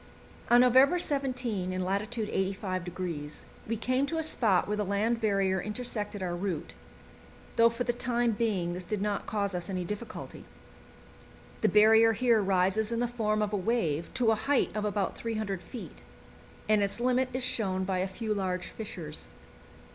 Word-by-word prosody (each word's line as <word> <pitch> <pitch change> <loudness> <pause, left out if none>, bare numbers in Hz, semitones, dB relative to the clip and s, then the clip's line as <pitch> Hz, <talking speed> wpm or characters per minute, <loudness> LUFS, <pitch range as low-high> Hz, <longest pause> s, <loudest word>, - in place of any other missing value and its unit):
On 240 +1 +7
November 260 +6 +6
17, 250 - -1
in 185 0 -2
lat. 195 +2 +1
85°, 185 -7 -3 0.2
we 230 +1 -1
came 255 +5 0
to 325 - -2
a 320 - 0
spot 220 - +2
where 210 - 0
the 210 - 0
land 215 +4 0
barrier 195 -3 +1
intersected 210 -2 -3
our 175 -1 -2
route, 180 -2 -3 0.8
though 230 0 +6
for 235 +2 -3
the 240 - 0
time 240 -1 +1
being 205 -6 -1
this 180 +1 -5
did 210 +3 -3
not 205 0 -2
cause 200 -2 -1
us 175 0 -4
any 185 -2 -2
difficulty. 210 +4 -7 1.2
The - - +4
barrier 220 +2 +6
here 230 -1 +3
rises 195 +3 +1
in 230 - -1
the 245 - +1
form 215 -3 0
of 210 0 -3
a - - +2
wave 180 -7 -1
to 240 -4 +3
a - - +3
height 255 +4 0
of 210 0 -1
about 205 -2 -1
300 215 -5 -3
feet, 240 +5 -9 0.7
and 215 -1 +4
its 200 +3 0
limit 255 +1 +2
is 255 0 -2
shown 195 -7 +1
by 185 -1 -1
a 185 - 0
few 215 +3 -3
large 185 -3 -2
fissures. 175 -9 -7
210 Hz, 170 wpm, -29 LUFS, 190-235 Hz, 1.2 s, On